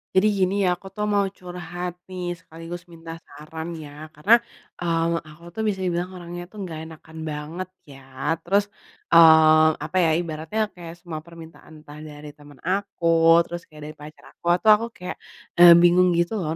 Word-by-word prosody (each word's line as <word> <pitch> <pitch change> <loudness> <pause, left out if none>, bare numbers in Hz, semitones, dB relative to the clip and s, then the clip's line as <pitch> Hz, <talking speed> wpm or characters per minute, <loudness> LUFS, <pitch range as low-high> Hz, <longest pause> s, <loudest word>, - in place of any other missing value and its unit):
Jadi 190 +3 +5
gini 185 0 +2
ya 185 - +3
aku 195 - -12
tuh 210 - -3
mau 200 -1 +3
curhat 180 -1 -7
nih 180 -1 -5
sekaligus 165 +2 -10
minta 165 -1 -11 0.2
saran 160 +2 -8
ya, 150 -1 -10
karena, 205 +11 +5 0.4
eee, 170 -1 0
aku 155 +2 -15
tuh 220 - -3
bisa 190 -3 -2
dibilang 180 +1 -2
orangnya 175 0 -8
tuh 205 +1 -9
nggak 165 -4 -6
enakan 160 0 -14
banget 155 +5 -6 0.2
ya, 135 - -13 0.4
terus, 200 +3 +2 0.5
eee, 160 -1 +7 0.2
apa 185 - -3
ya 165 - +3
ibaratnya 160 +4 -4 0.2
kayak 170 -2 -9
semua 165 -2 -7
permintaan 160 -1 -14
entah 145 0 -12
dari 150 -1 -10
temen 145 0 -17
aku, 195 -1 -2 0.4
terus 175 0 -7
kayak 155 -2 -15
dari - - -17
pacar 150 +1 -13
aku, - - -27
itu 200 +5 -5
aku 230 - -3
kayak, 180 0 -7 0.4
eee, 175 -1 +10
bingung 180 +1 +5
gitu 170 +4 0
loh 160 -3 -3
170 Hz, 175 wpm, -23 LUFS, 155-180 Hz, 0.5 s, eee